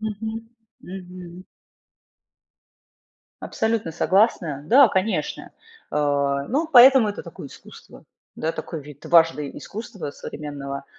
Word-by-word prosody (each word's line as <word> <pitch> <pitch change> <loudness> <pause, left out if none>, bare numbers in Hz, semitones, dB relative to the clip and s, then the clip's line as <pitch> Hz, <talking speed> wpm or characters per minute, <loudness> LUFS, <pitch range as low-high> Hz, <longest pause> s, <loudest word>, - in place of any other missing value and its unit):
Мгм, 220 +1 -5 0.3
мгм. 180 -1 -10 2.0
Абсолютно 220 -6 -2
согласна. 170 -5 +1
Да, 260 - +6
конечно. 195 +3 -2 0.4
Э, 140 -1 0
ну, 310 +6 -1
поэтому 255 -2 +8
это 205 - -5
такое 170 -4 -10
искусство. - - -15 0.3
Да, 160 - -3
такой 165 -1 -6
вид 145 0 -14
важный 165 -4 +2
искусства 210 -7 -7
современного, 140 -2 -7
180 Hz, 100 wpm, -23 LUFS, 150-220 Hz, 2.0 s, поэтому